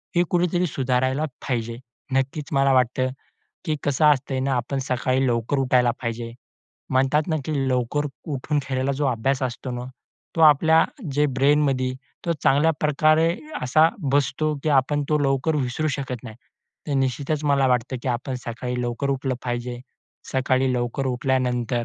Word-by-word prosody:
हे 175 - +4
कुठेतरी 175 0 +1
सुधारायला 130 +1 0 0.2
पाहिजे. 115 -2 -2 0.4
नक्कीच 135 +2 -1
मला 135 0 +3
वाटतं, 130 0 +2 0.6
की 155 - -1
कसं 145 +2 +1
असतं 135 -1 -2
ना, 135 -1 +1
आपण 130 +3 -2
सकाळी 130 +1 +1
लवकर 120 +3 0
उठायला 125 -2 +3
पाहिजे. 115 -1 -4 0.6
म्हणतात 135 +4 +3
ना, 160 - +1
की 155 - -3 0.2
लवकर 130 +4 0 0.3
उठून 145 +2 -1
खेळायला, 130 +1 -1
जो 145 +1 0
अभ्यास 130 +2 0
असतो 130 0 -3
ना, 125 0 -4 0.5
तो - - 0
आपल्या 160 +1 +6 0.3
जे 150 +2 +3
ब्रेनमध्ये, 135 -1 +2 0.3
तो 170 - +1
चांगल्या 145 +4 +4
प्रकारे 155 +2 +3 0.3
असा 155 +6 +4 0.2
बसतो, 145 +2 +1
की 155 - -1
आपण 145 +1 +2
तो 150 - +3
लवकर 140 +2 +1
विसरू 135 +3 -1
शकत 130 -4 -5
नाही. 110 -3 -9 0.5
तर 145 - 0
निश्चितच 140 +3 -1
मला 140 -2 +3
वाटतं, 125 +1 0
की - - -2
आपण 125 +2 -2
सकाळी 125 +1 -3
लवकर 120 +3 -2
उठलं 135 -1 -1
पाहिजे. 120 0 -3 0.5
सकाळी 130 0 +1
लवकर 120 +2 -2
उठल्यानंतर, 125 -2 0
135 Hz, 150 wpm, -23 LUFS, 125-145 Hz, 0.6 s, आपल्या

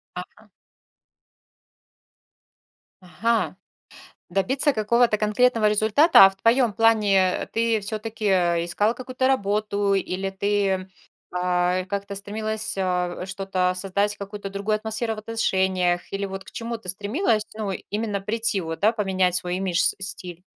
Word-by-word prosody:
Ага. - - -10 2.5
Ага, 185 +1 -1 0.7
добиться 255 - +1
какого-то 230 0 +2
конкретного 215 +2 +2
результата. 215 - +6
А - - +6
в 195 - -14
твоём 230 +3 +2
плане, 220 -3 +3 0.3
э, - - -5
ты 230 -1 0
всё-таки, 215 +1 -5
э, 175 -3 +2
искала 210 +6 +1
какую-то 255 +1 -2
работу 205 -4 0
или 190 0 -1
ты, 195 -1 -1 0.4
а, 180 0 0
как-то 200 +1 -4
стремилась, 215 +2 -4
а, 180 -1 -1
что-то 190 -1 -1
создать, 200 +2 -1
какую-то 200 0 -7
другую 200 +2 -1
атмосферу 220 +1 -3
в - - -7
отношениях, 190 -5 0
или 195 0 -2
вот 195 0 -6
к - - -14
чему 235 0 -5
ты 190 -5 -10
стремилась, 215 - 0
ну, 210 -3 -3 0.2
именно 210 -1 -2
прийти, 215 +1 -1
вот, 165 -2 -5
да, 215 +2 +5
поменять 190 -5 0
свой 180 0 -1
имидж, 185 -2 -1
с - - +2
стиль? 180 -3 -8
200 Hz, 135 wpm, -24 LUFS, 190-220 Hz, 2.5 s, результата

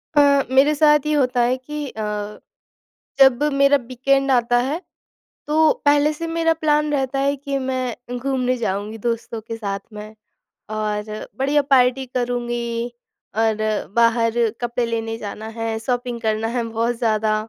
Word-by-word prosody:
अ, 280 -1 +5
मेरे 275 +3 +5
साथ 300 -1 +4
ये 305 - 0
होता 250 -4 +2
है 245 +2 +2
कि 295 +3 -6
अ, 220 - -7 1.2
जब 265 0 +6
मेरा 280 +1 +5
वीकेंड 270 +2 +1
आता 245 -1 +3
है, 310 +6 -2 0.7
तो 310 +1 +4
पहले 290 +1 +4
से 330 +2 -5
मेरा 330 0 +1
प्लान 300 -1 +2
रहता 270 -1 -1
है 280 +1 +1
कि 280 0 -3
मैं 255 -2 -4
घूमने 255 -1 0
जाऊँगी 210 -1 -3
दोस्तों 230 0 -3
के 225 +1 -7
साथ 200 -3 -4
मैं। 210 +1 -9 0.6
और 215 0 -3
बढ़िया 285 +2 +2
पार्टी 260 0 +4
करूँगी, 240 -1 -2 0.4
और 220 -1 +2 0.4
बाहर 230 -1 +3 0.3
कपड़े 240 0 -1
लेने 225 -1 -3
जाना 215 0 -7
है, 225 0 -3
शॉपिंग 245 0 -2
करना 220 0 -1
है, 240 +1 -1
बहुत 230 +2 -1
ज़्यादा, 215 -2 +1
245 Hz, 150 wpm, -21 LUFS, 225-275 Hz, 1.2 s, जब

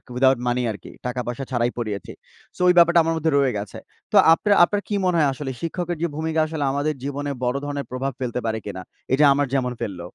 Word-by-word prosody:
Without 130 -1 +4
money 125 +1 +1
আরকি 105 - -10 0.2
টাকা-পয়সা 125 +1 -4
ছাড়াই 120 -1 +1
পড়িয়েছি। 105 -5 -4 0.4
সো - - -8
ওই 180 - +6
ব্যাপারটা 170 0 +6
আমার 165 0 0
মধ্যে 160 0 0
রয়ে 135 -5 +2
গেছে। 100 -1 -6 0.3
তো - - +4 0.2
আপনার 205 +4 +2
আপনার 205 +2 -2
কি 205 - 0
মনে 180 -2 +2
হয় 145 -3 +4
আসলে 135 -1 -5
শিক্ষকের 175 0 -3
যে 170 - +1
ভূমিকা 160 0 -1
আসলে 155 -2 -3
আমাদের 145 +2 -1
জীবনে 145 0 -3
বড় 125 +3 0
ধরনের 145 -1 -4
প্রভাব 135 +2 -2
ফেলতে 125 0 -2
পারে 110 0 -1
কিনা? 95 -2 -6 0.3
এইযে 145 +2 +5
আমার 145 0 0
যেমন 125 -2 0
ফেলল? 95 -4 -4
140 Hz, 215 wpm, -23 LUFS, 125-160 Hz, 0.4 s, ওই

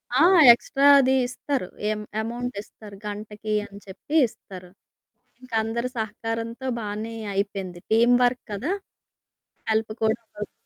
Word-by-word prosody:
ఆ! 310 +6 +6 0.3
ఎక్స్ట్రా 275 +4 +2
అది 265 0 +3
ఇస్తారు 255 -5 -3 0.2
ఎ - - +2 0.3
అమౌంట్ 240 +2 -4
ఇస్తారు, 210 -2 -14
గంటకి 210 +1 -5
అని 200 0 -12
చెప్పి 200 +11 -7
ఇస్తారు. 185 -4 -12 0.7
ఇంకా 250 -3 -7
అందరి 235 +3 -2
సహకారంతో 225 +3 -4
బానే 215 +2 -5 0.2
అయిపోయింది 195 -3 -3
టీమ్ 240 +2 +5
వర్క్ 245 0 +1
కదా! 260 - -2 1.0
హెల్ప్ 220 0 0
కూడ 220 - +4
అవుతుంది. 210 -2 -9
225 Hz, 125 wpm, -24 LUFS, 205-245 Hz, 1.0 s, ఆ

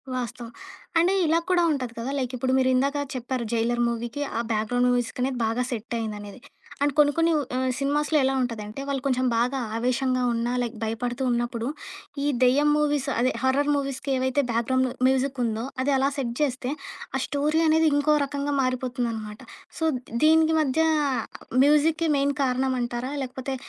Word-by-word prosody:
వాస్తవం. 240 -1 -5 0.5
అండ్ 355 +3 +3
ఇలా 325 +2 +3
కూడా 355 -1 +3
ఉంటది 255 -5 -3
కదా! 255 +4 -3
లైక్ 255 -1 -2
ఇప్పుడు 260 +2 0
మీరు 260 0 +3
ఇందాక 280 +3 +1 0.2
చెప్పారు 250 0 -3
'జైలర్' 235 +1 +1
మూవీకి 235 +4 -4 0.2
ఆ - - 0
బ్యాక్‌ 215 0 0
గ్రౌండ్ 245 0 +2
మ్యూజిక్ 245 0 -2
అనేది 255 -1 -1
బాగా 230 +3 0
సెటయిందినేది. 220 -2 -5 0.4
అండ్ 285 -2 +2
కొన్ని 290 -1 +6
కొన్ని 330 0 +3 0.2
ఆహ్, 260 0 0
సినిమాస్‌లో 295 +2 +1
ఎలా 265 +1 +2
ఉంటదంటే 225 0 -4
వాళ్ళు 275 -2 -1
కొంచెం 255 -1 +1
బాగా 250 +3 +1 0.2
ఆవేశంగా 255 +1 0
ఉన్నా, 235 +1 -1
లైక్ 235 -1 -3
భయపడుతూ 240 +3 -2
ఉన్నప్పుడు 240 0 -1 0.6
ఈ - - +2 0.2
దెయ్యం 285 +4 +4
మూవీస్ 295 -2 +1
అదే 255 +2 +2
హార్రర్ 280 +3 +2
మూవీస్‌కి 275 0 -3
ఏవైతే 260 +2 +1
బ్యాక్‌ 230 +1 0
గ్రౌండ్ 260 0 +2 0.2
మ్యూజికుందో 255 -4 0 0.2
అది 280 0 +1
అలా 270 +1 +2
సెట్ 240 -3 -2
జేస్తే 260 -2 -1 0.4
ఆ - - +1
స్టోరీ 300 +3 +1
అనేది 320 0 +4
ఇంకో 300 +1 +3
రకంగా 285 +1 -3
మారిపోతుందనమాట. 240 -4 -2 0.4
సో, - - -2 0.4
దీనికి 320 0 +5
మధ్య 290 +1 0 0.9
మ్యూజిక్‌కి 310 +2 +3
మెయిన్ 280 +1 +1
కారణం 260 0 0
అంటారా? 240 +2 -3
లేకపోతే 260 +1 -5
260 Hz, 160 wpm, -25 LUFS, 240-285 Hz, 0.9 s, కొన్ని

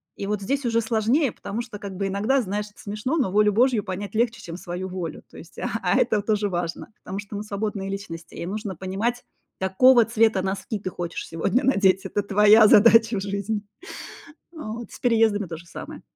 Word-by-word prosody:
И 200 - -5
вот 210 0 -2
здесь 275 +7 -2
уже 230 -1 +2
сложнее, 230 +5 +1
потому 220 +4 -5
что, 235 -3 -8
как, 200 -2 -7
бы 195 -1 -1
иногда, 215 +8 +1
знаешь- 210 0 -3
это - - -23
смешно, 215 +10 -3
но 240 -10 +1
волю 210 0 +3
Божью 240 -1 +3
понять 200 +1 -6
легче, 235 0 0
чем 170 -3 -8
свою 180 +1 -5
волю. 180 -3 -6
То - - -15
есть - - -12
а - - -2
а - - +2
это 210 -2 +2
тоже 210 -1 0
важно, 175 +3 -4
потому 190 +2 -5
что 205 0 -8
мы 205 - -4
свободные 200 -1 -4
личности, 185 -4 -7
и - - -5
нужно 205 0 -4
понимать, 205 +7 -2 0.4
какого 235 +6 +5
цвета 225 -3 +2
носки 195 +3 -3
ты 185 - -4
хочешь 175 -2 -5
сегодня 165 - 0
надеть, 195 -7 +3
это 205 - -2
твоя 210 +2 +6
задача 225 +1 +6
в - - -5
жизни. 200 +1 -3 0.9
Вот. 235 -7 -7
С - - -11
переездами 220 -5 +2
тоже 165 0 -8
самое. 165 - -9
210 Hz, 195 wpm, -24 LUFS, 190-225 Hz, 0.9 s, твоя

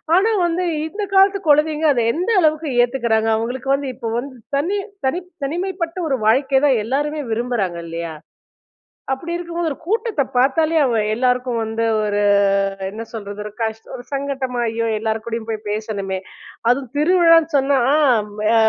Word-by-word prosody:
ஆனா 405 +5 +3
வந்து, 345 +1 0 0.2
இந்த 415 +5 -5
காலத்து 390 +1 +5
குழந்தைங்க 305 +1 +3
அத 245 - +1
எந்த 360 +7 -1
அளவுக்கு 310 -1 +1
ஏத்துக்குறாங்க? 235 -3 +1
அவங்களுக்கு 250 +4 -4
வந்து, 275 -1 -4
இப்போ 230 -2 -5
வந்து, 260 +1 -7 0.2
தனி 350 +9 0 0.3
தனிப் 355 +6 -3 0.2
தனிமைப்பட்ட 345 +2 -3
ஒரு 270 - +1
வாழ்க்கை 265 +4 +3
தான் 260 -5 +3
எல்லாருமே 295 +4 -1
விரும்புறாங்க, 220 -6 -1
இல்லையா? 165 0 -5 1.0
அப்படி 335 +6 -5
இருக்கும்போது 345 -1 -3
ஒரு - - -4
கூட்டத்தப் 435 - -1
பாத்தாலே 310 +6 +3
அவ 235 -5 +2
எல்லாருக்கும் 250 0 0
வந்து 225 +1 -2 0.2
ஒரு, 205 0 0 0.7
என்ன 220 +3 -6
சொல்றது? 205 -2 -7
ஒரு 210 - -6
கஷ்ட் 220 0 -3
ஒரு 245 - -8
சங்கட்டமா, 270 -3 -2
"ஐயோ! 230 +1 -2
எல்லார் 220 0 -2
கூடயும் 230 -1 -4
போய் 220 -1 -4
பேசணுமே" 205 -3 -3 0.5
அதுவும் 250 0 0
திருவிழான்னு 330 0 +4
சொன்னா, 275 0 +2 0.2
ஆ - - +4 0.4
ம் 210 +1 -8
எ - - +4
265 Hz, 155 wpm, -20 LUFS, 225-320 Hz, 1.0 s, காலத்து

